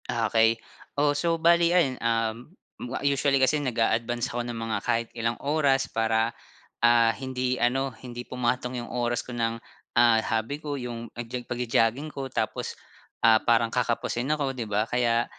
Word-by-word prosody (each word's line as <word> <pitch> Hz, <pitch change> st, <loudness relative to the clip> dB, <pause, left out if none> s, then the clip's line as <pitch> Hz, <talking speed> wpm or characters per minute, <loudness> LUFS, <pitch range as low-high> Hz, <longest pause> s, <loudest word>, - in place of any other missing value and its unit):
Ah, 115 Hz, -1 st, 0 dB
okey. 115 Hz, 0 st, +4 dB, 0.4 s
Oh, 145 Hz, 0 st, +3 dB
so 165 Hz, +3 st, 0 dB
bale 170 Hz, +1 st, +4 dB
ayun, 170 Hz, -8 st, +2 dB
um, 115 Hz, +2 st, -1 dB, 0.3 s
ma 125 Hz, +1 st, -4 dB
usually 140 Hz, 0 st, +2 dB
kasi 135 Hz, +3 st, +2 dB
nag-a-advance 120 Hz, -1 st, 0 dB
ako 120 Hz, -, -1 dB
ng 120 Hz, -, -4 dB
mga 115 Hz, -1 st, -2 dB
kahit 115 Hz, -1 st, 0 dB
ilang 115 Hz, 0 st, -2 dB
oras 140 Hz, -2 st, +2 dB
para, 115 Hz, +1 st, +1 dB, 0.5 s
ah, 120 Hz, -1 st, +5 dB
hindi 130 Hz, -1 st, -2 dB
ano, 130 Hz, +1 st, 0 dB
hindi 120 Hz, 0 st, -8 dB
pumatong 125 Hz, 0 st, -1 dB
yung -, -, -9 dB
oras 120 Hz, -1 st, -1 dB
ko 125 Hz, -, -9 dB
ng, 115 Hz, -1 st, -1 dB, 0.4 s
ah, 120 Hz, -1 st, +6 dB
hobby 115 Hz, +6 st, -2 dB
ko, 145 Hz, -2 st, -4 dB
yung 120 Hz, -3 st, -6 dB
nag-jog 120 Hz, +1 st, -6 dB
pagjo-jogging 120 Hz, +4 st, 0 dB
ko, 135 Hz, -1 st, -5 dB
tapos, -, -, -3 dB, 0.5 s
ah, 110 Hz, -1 st, +7 dB
parang 115 Hz, -1 st, +2 dB
kakapusin 120 Hz, 0 st, -1 dB
ako, 145 Hz, -3 st, 0 dB
'di 120 Hz, -4 st, -5 dB
ba? 105 Hz, +1 st, +1 dB
Kaya, 120 Hz, 0 st, +1 dB
120 Hz, 165 wpm, -26 LUFS, 115-135 Hz, 0.5 s, ah